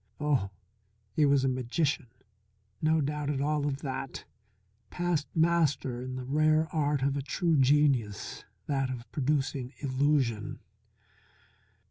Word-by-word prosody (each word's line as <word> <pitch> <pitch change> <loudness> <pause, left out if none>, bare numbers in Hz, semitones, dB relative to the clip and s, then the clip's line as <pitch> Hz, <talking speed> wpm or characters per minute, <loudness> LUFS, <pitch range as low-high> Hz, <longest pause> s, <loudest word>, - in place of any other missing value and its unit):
Oh, 145 -9 +1 0.6
he 145 +8 +3
was 140 -1 +4
a - - +2
magician, 130 +3 0 0.7
no 160 0 +3
doubt 150 0 -2
at 145 -2 -1
all 145 +1 0
of 140 -1 -3
that! 135 -1 -5 0.6
Past 175 -4 -1
master 160 -7 +2
in 130 0 -5
the 130 - -4
rare 155 +3 +3
art 145 -3 +1
of 140 0 +1
a 140 - -1
true 165 +4 0
genius, 135 -6 +2 0.2
that 135 -2 0
of 125 -2 -5
producing 135 -2 -1
illusion. 130 -5 0
140 Hz, 125 wpm, -29 LUFS, 130-150 Hz, 0.7 s, was